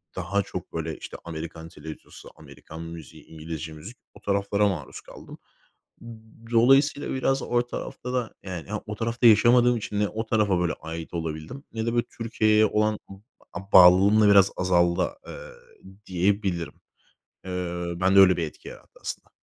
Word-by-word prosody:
daha 100 +3 -1
çok, - - -8
böyle, 80 -1 -4
işte, - - -9
Amerikan 80 0 -7
televizyonu 80 0 -11
Amerikan 80 +1 -12
müziği, 80 -3 -10
İngilizce 80 0 -7
müzik 90 +11 -11 0.2
o - - -15
taraflara 100 +1 +1
maruz 85 -10 -5
kaldım. - - -13 1.1
Dolayısıyla, 135 +5 +3
biraz 135 0 0
o 120 0 0
tarafta 125 +1 -6
da, 125 -3 -2
yani, 90 -4 -7
ha, 105 +1 -3
o 105 - -6
tarafta 115 +3 +1
yaşamadığım 120 +3 +5
için 105 -2 -4
ne 105 - +2
o 110 +2 -4
tarafa, 105 -5 +1
böyle, 90 -2 0
ait 80 +1 -8
olabildim 80 - -5
ne 110 0 -3
de, 115 - -1
böyle, 120 0 +1
Türkiye'ye 110 -1 +2
olan, 105 0 0
ımm, 95 +1 -13 0.3
a 95 +1 -9
bağlılığım 95 +4 +7
da 105 - +5
biraz 100 -1 +6
azaldı, 85 -1 +2 0.2
eee, - - -9 0.5
diyebilirim. 90 -3 -1 0.7
Eee, 90 -1 -4
bende 95 +2 +4
öyle 95 -1 +6
bir 85 - -1
etki 75 - -12
yarattı - - -15
aslında. - - -7
100 Hz, 155 wpm, -25 LUFS, 85-110 Hz, 1.1 s, bağlılığım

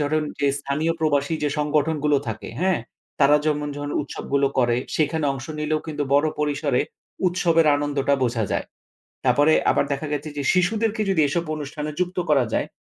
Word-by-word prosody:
ধরুন 155 0 +2 0.2
যে 145 - +2
স্থানীয় 145 +4 -1
প্রবাসী 145 0 +1
যে 145 - +2
সংগঠনগুলো 150 0 +1
থাকে 110 0 -5
হ্যাঁ? 185 -5 +2 0.4
তারা 140 +1 +6
যেমন, 150 -1 0
যখন 145 0 -4
উৎসবগুলো 140 -1 -1
করে 120 -2 +3 0.2
সেখানে 155 0 +1
অংশ 135 -1 -7
নিলেও 155 0 0
কিন্তু 150 -2 -3
বড় 145 +2 +4
পরিসরে 145 -3 +1 0.4
উৎসবের 170 -2 +3
আনন্দটা 145 -1 0
বোঝা 120 -3 +1
যায়। - - -1 0.6
তারপরে 150 +2 +4 0.2
আবার - - +2
দেখা 140 +3 -4
গেছে 150 +1 -3
যে 140 - -1
শিশুদেরকে 215 +4 +1
যদি 180 -5 +3
এসব 170 +4 -1
অনুষ্ঠানে 150 0 -5
যুক্ত 180 0 -1
করা 135 -5 +4
যায়, - - 0
150 Hz, 165 wpm, -23 LUFS, 140-160 Hz, 0.6 s, তারা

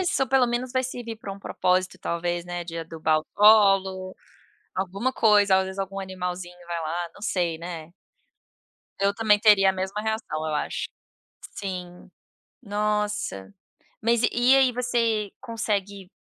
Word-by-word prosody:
Isso, 345 -7 +1
pelo 260 0 +4
menos 245 +1 -2
vai 260 -1 +1
servir 240 -3 -6
para 200 -3 -7
um 195 - -10
propósito 185 -1 0
talvez, 175 0 -2
né, 175 -1 -5
de 165 -1 -6
adubar 160 -1 0
o - - -16
solo, 195 -3 +5 0.6
alguma 195 +7 -2
coisa, 205 -4 +4
às 190 - +2
vezes 190 +1 -7
algum 195 0 -3
animalzinho 180 -2 -5
vai 170 -1 -3
lá, 170 +1 -3
não - - -15
sei, 175 -6 -1
né. 170 -1 -7 1.1
Eu 200 0 +2
também 210 -1 +3
teria 205 -3 +6
a - - -2
mesma 190 +2 -3
reação 220 -8 -3
eu 155 - -2
acho. - - -2 0.7
Sim. 180 -3 -6 0.5
Nossa, 210 - -2 0.5
mas 235 +1 +2
e 250 +3 +5
aí, 265 -2 +4
você 230 -4 0
consegue 200 -5 -3
195 Hz, 150 wpm, -25 LUFS, 175-220 Hz, 1.1 s, teria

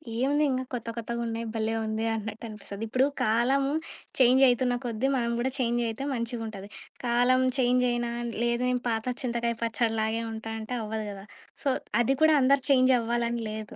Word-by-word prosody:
ఏముందింక 275 +1 +1
కొత్త 235 -1 -4
కొత్తగున్నాయి. 230 0 -3
భలే 220 0 0
ఉంది 220 +1 -2
అన్నట్టనిపిస్తది. 215 -1 -6
ఇప్పుడు 255 +4 +2 0.2
కాలము 260 +5 +2 0.5
చేంజయితున్న 250 -1 +5
కొద్ది 235 +2 -1
మనం 235 -2 0
గూడా 260 +2 0
చేంజయితే 235 0 0
మంచిగుంటది. 225 -4 -4 0.4
కాలం 245 +2 +3
చేంజయినా 245 -1 +2 0.3
లేదు 235 0 +1
నేను 250 -1 -1
పాత 225 -1 -1 0.2
చింతకాయ 235 -1 -1
పచ్చడిలాగే 225 -1 0
ఉంటా 225 0 -6
అంటే 220 +3 -4
అవ్వదు 215 0 -3
గదా! 195 0 -9 0.4
సో 280 - +2 0.3
అది 265 +3 +2
కూడా 315 -1 +6
అందరు 270 +1 +4
చేంజవ్వాలని 240 -2 +2
లేదు. 215 -1 -7
235 Hz, 135 wpm, -27 LUFS, 225-255 Hz, 0.5 s, కూడా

